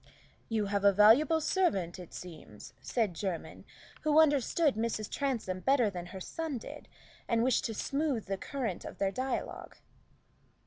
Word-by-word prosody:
"You 220 -2 0
have 200 0 -1
a 200 - +7
valuable 230 - +6
servant, 195 - 0
it 180 - -10
seems," 155 - -10
said 220 -7 0
Jermyn, 180 0 -5 0.4
who 305 0 +4
understood 295 0 +3
Mrs. 220 -1 -2
Transome 235 -10 -2
better 250 -1 +3
than 175 -2 -6
her 190 - -8
son 315 - -4
did, 225 - -10 0.4
and 230 -1 +2
wished 255 -1 +2
to 225 - -2
smoothen 275 -2 -1
the 195 - -2
current 230 -3 -4
of - - -8
their 195 -1 0
dialogue. 260 +6 -4
225 Hz, 150 wpm, -31 LUFS, 195-280 Hz, 0.4 s, a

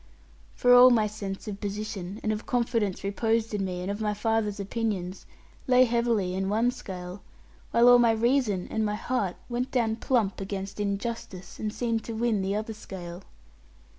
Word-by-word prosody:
For 245 - +5
all 250 +1 +9
my 230 -3 +4
sense 205 -2 -6
of 200 -1 -6
position, 205 -1 -4
and 215 - +1
of 215 0 -4
confidence 230 -5 0
reposed 225 +3 0
in 205 -2 -1
me, 180 -1 -3
and 190 - -2
of 205 +2 -5
my 210 -1 0
father's 210 -1 0
opinions, 200 -3 -3 0.4
lay 255 0 +6
heavily 230 -6 +1
in 190 +1 -1
one 225 +4 +2
scale, 185 -5 -8 0.5
while 235 +1 +4
all 245 0 +8
my 235 -1 +5
reason 225 -4 +1
and 220 - 0
my 210 -1 0
heart 210 -5 -1
went 245 +1 -2
down 225 -3 0
plump 225 -6 0
against 195 +1 -5
injustice, 200 -2 -4
and 215 - -2
seemed 230 -1 -1
to 230 - -5
win 225 -3 +1
the 195 +1 -1
other 220 +1 -3
scale. 180 -4 -8
215 Hz, 175 wpm, -27 LUFS, 195-235 Hz, 0.5 s, all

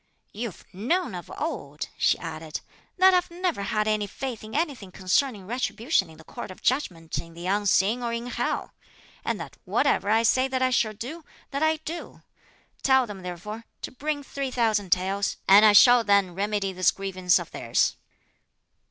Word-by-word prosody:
"You've 220 -2 -6
known 255 - 0
of 175 -1 -8
old," 180 - -4
she - - +2
added, 160 -2 -6 0.4
"that 375 +1 +6
I've 360 0 +2
never 345 - -2
had 215 +1 0
any 215 -1 +1
faith 245 +2 -6
in 215 +3 -8
anything 280 - -2
concerning 195 +3 0
retribution 235 - 0
in 160 - -14
the 160 - -14
Court - - -8
of 185 - -12
Judgment 180 - -1
in 165 0 -10
the 170 +1 -8
unseen 205 +3 +2
or 235 -1 -2
in 235 +1 -3
hell; 245 - -2 0.5
and - - -2
that - - -8
whatever 200 - +1
I 225 +2 +4
say 255 +3 +3
that 260 -1 -2
I 255 - +2
shall 220 -3 +2
do, 265 +11 -7 0.3
that 280 +1 -2
I 315 0 +3
do; 320 +2 -8 0.6
tell 265 -1 +4
them 205 -4 -8
therefore 205 +6 -7 0.2
to - - -4
bring 290 +2 -3
three 275 -1 -4
thousand 220 -6 0
taels; 195 +2 +1
and 200 +2 +8
I 215 -1 +7
shall 245 +3 +8
then 200 -3 +3
remedy 200 0 -1
this 185 0 +3
grievance 185 -2 +1
of - - -6
theirs." - - +1
215 Hz, 180 wpm, -26 LUFS, 190-260 Hz, 0.6 s, and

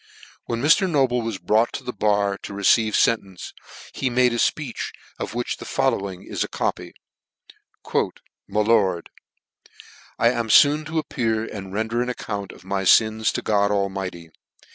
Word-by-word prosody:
When 115 +1 -3
Mr. 185 +6 +4
Noble 130 -6 +2
was 115 -3 -3
brought 110 +4 +2
to - - -5
the 125 - -5
bar 100 -1 +1
to 100 - -8
receive 105 +2 +3
fentence, 100 -5 0 0.4
he 130 - -1
made 125 0 +3
a - - -1
fpeech, 135 +1 -1 0.3
of - - -5
which 120 0 -2
the - - -9
following 100 -9 -1
is - - -3
a - - -4
copy: - - -3 1.0
My 105 +2 -2
Lord, 105 -6 +1 0.6
*' - - -20 0.3
I 115 - +4
am 120 -2 -2
foon 150 +7 +5
to 160 +2 -4
appear 115 -7 -1
and 95 -4 -8
render 110 +3 -1
an 125 - -2
account 105 -5 -5
of 90 - -16
my 95 0 -2
fins 110 +3 +4
to - - -3
God 100 -1 +2
Almighty. 95 -4 -3
110 Hz, 165 wpm, -23 LUFS, 100-120 Hz, 1.0 s, foon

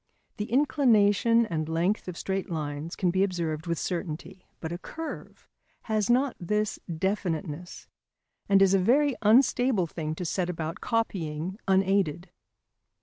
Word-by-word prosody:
The 210 +1 -4
inclination 230 -5 +4
and 160 -6 -3
length 175 +6 0
of 180 -2 -6
straight 195 0 -3
lines 150 0 -4
can 180 -2 +1
be 190 +2 +2
observed 170 -4 -2
with 170 -1 -1
certainty. 180 +2 -5
But 160 - -5
a 175 - -4
curve 325 - -8 0.4
has 215 -2 0
not 255 +2 +3
this 210 +4 -1
definiteness, 175 -2 -3 0.6
and 195 -1 +6
is 195 0 +4
a 195 - +5
very 270 +8 +3
unstable 240 -2 +4
thing 155 -1 -4
to 180 - -5
set 180 +1 -1
about 165 -1 -4
copying 185 -5 -2
unaided. 190 -3 +1
190 Hz, 140 wpm, -27 LUFS, 165-215 Hz, 0.6 s, and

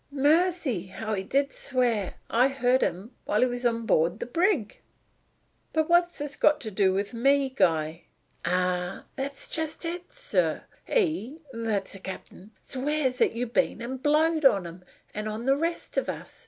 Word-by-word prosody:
Mercy! 290 - +2
how 215 +3 -4
he 195 - -1
did 275 +8 0
swear! 240 -7 0
I 245 +3 +4
heard 260 -1 +2
him 195 +7 -2
while 210 - +1
he - - +6
was 245 0 0
on 230 -1 -2
board 170 +1 +2
the - - -3
brig." 330 - 0 0.9
"But 315 -1 +2
what 345 +1 +6
has 345 - -13
this 290 -1 -5 0.2
to 220 - -4
do 190 -1 +3
with 200 +3 -2
me, 270 +3 +2
Guy?" 160 - +1 0.4
"Ah, 180 +1 -1
that's 275 0 -3
just 320 +1 -3
it, 345 +1 -4
sir! - - 0 0.2
He 320 - 0
that's 220 -4 -2
the 195 - -7
cap'n 190 +1 -9
swears 270 -1 -1
'at - - +4
you've 235 0 -3
been - - +1
and 250 +2 -5
blowed 310 +2 +3
on 200 -9 +5
him; 170 +2 -9 0.3
and 210 +1 -3
on 220 +2 -5
the 270 +1 +4
rest 335 +4 -3
of - - -4
us. - - -7
250 Hz, 170 wpm, -27 LUFS, 205-295 Hz, 0.9 s, he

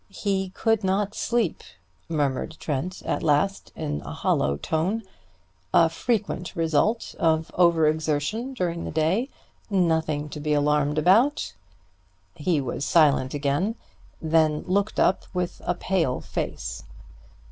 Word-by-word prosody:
"He 195 -1 -1
could 225 -2 +1
not 195 +2 0
sleep!" 235 -7 0 0.5
murmured 150 0 -1
Trent 165 +6 -3
at - - -1
last 165 +6 +1
in 75 0 -3
a - - -7
hollow 70 +1 +1
tone. 180 - -1 0.7
"A 165 -1 +6
frequent 200 0 -2
result 165 +8 +1
of 160 0 +1
over 170 -3 +4
exertion 160 - -1
during 170 -6 -2
the - - -4
day. 165 - +1 0.4
Nothing 160 -6 +1
to 150 - -7
be 150 0 0
alarmed 150 0 +2
about." 225 - +3 0.8
He 165 -1 0
was 135 0 -3
silent 145 -5 +3
again, 145 +10 0 0.4
then 155 -1 +2
looked 200 +3 0
up 185 - +2
with 180 -1 -2
a 175 - +1
pale 165 -9 0
face. - - -4
165 Hz, 125 wpm, -25 LUFS, 150-195 Hz, 0.8 s, A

